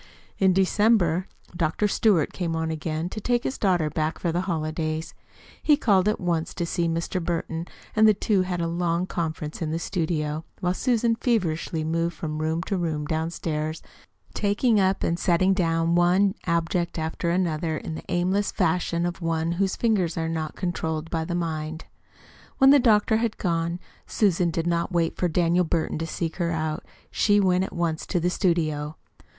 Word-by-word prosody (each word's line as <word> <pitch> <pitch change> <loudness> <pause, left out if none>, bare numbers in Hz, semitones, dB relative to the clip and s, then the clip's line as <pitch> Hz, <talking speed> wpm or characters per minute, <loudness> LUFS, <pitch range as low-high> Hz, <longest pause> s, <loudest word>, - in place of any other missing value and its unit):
In 190 -1 +5
December 190 -2 +3 0.3
Dr. 170 +5 +1
Stewart 200 -6 +2
came 170 -3 -2
on 160 0 -1
again 160 +1 -3
to 215 - -6
take 240 +2 +1
his 260 - -3
daughter 180 -6 +2
back 155 +1 -2
for 170 - -1
the 175 +2 0
holidays. 155 -2 -2 0.5
He 300 -2 +4
called 200 -8 +3
at 210 - +1
once 170 -2 -1
to 170 - -1
see 170 0 -1
Mr. 165 +2 -2
Burton, 165 0 -3 0.3
and 220 0 +6
the 215 - +5
two 200 -1 +1
had 180 -1 -2
a 170 - 0
long 170 +1 0
conference 160 -4 -4
in 160 - -1
the 160 - -1
studio, 160 -3 -2 0.2
while 180 -1 0
Susan 235 +1 +1
feverishly 175 -9 -1
moved 165 +1 -1
from 155 -1 -4
room 160 +2 -1
to 195 - -2
room 160 -4 -2
downstairs, 160 0 -3 0.5
taking 210 +2 +2
up 190 0 +1
and 170 +1 0
setting 185 +2 +3
down 165 -2 +1
one 180 +3 +4
object 170 +1 0
after 160 +2 -2
another 165 -3 0
in 160 - -6
the 155 - -7
aimless 185 +3 +1
fashion 170 -1 0
of 175 +1 -4
one 165 0 0
whose 190 +2 0
fingers 195 -8 +1
are 160 0 -1
not 160 -1 -3
controlled 165 -3 -3
by 160 -1 0
the 175 +2 -3
mind. 160 -1 -3 0.7
When 270 0 +7
the 285 - +7
doctor 220 -2 +4
had 225 -1 -1
gone, 170 -1 -1 0.3
Susan 180 -4 +2
did 165 0 -2
not 170 +1 0
wait 170 -2 +1
for 180 - 0
Daniel 175 +1 +2
Burton 160 -2 -1
to 165 - -3
seek 165 -1 -3
her 170 -2 0
out. 155 -1 -2 0.3
She 205 -1 +3
went 185 -2 +3
at - - -9
once 170 -2 -2
to 180 - 0
the 175 +2 0
studio. 155 -5 0
170 Hz, 180 wpm, -25 LUFS, 160-185 Hz, 0.7 s, When